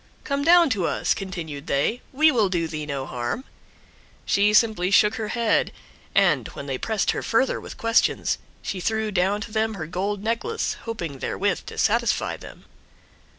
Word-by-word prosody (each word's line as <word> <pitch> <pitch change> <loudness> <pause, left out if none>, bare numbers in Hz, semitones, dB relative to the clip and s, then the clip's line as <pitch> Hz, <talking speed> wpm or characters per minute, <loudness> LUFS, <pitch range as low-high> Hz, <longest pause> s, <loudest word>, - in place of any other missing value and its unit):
"Come 280 0 -1
down 335 -2 +6
to 190 -6 +1
us," - - +1
continued 170 -7 -6
they, 145 - 0
"we 310 +4 +5
will 220 -7 +2
do 170 -3 0
thee 155 -2 -5
no 140 -2 -3
harm." 120 - -3 0.8
She 205 +1 +3
simply 215 -4 +3
shook 210 +2 +5
her 220 -1 -3
head, 230 0 +1 0.4
and, - - +3
when 140 - -6
they 135 -2 -3
pressed 220 -3 0
her - - -3
further 260 +4 +1
with - - -10
questions, 230 0 +1 0.2
she 190 - -3
threw 220 +3 -1
down 195 +2 +1
to 220 - -7
them 220 0 0
her 165 -5 -5
gold 195 +5 -3
necklace, 235 - -1
hoping 170 - -5
therewith - - -1
to - - -8
satisfy - - +1
them. - - -13
205 Hz, 170 wpm, -24 LUFS, 170-230 Hz, 0.8 s, down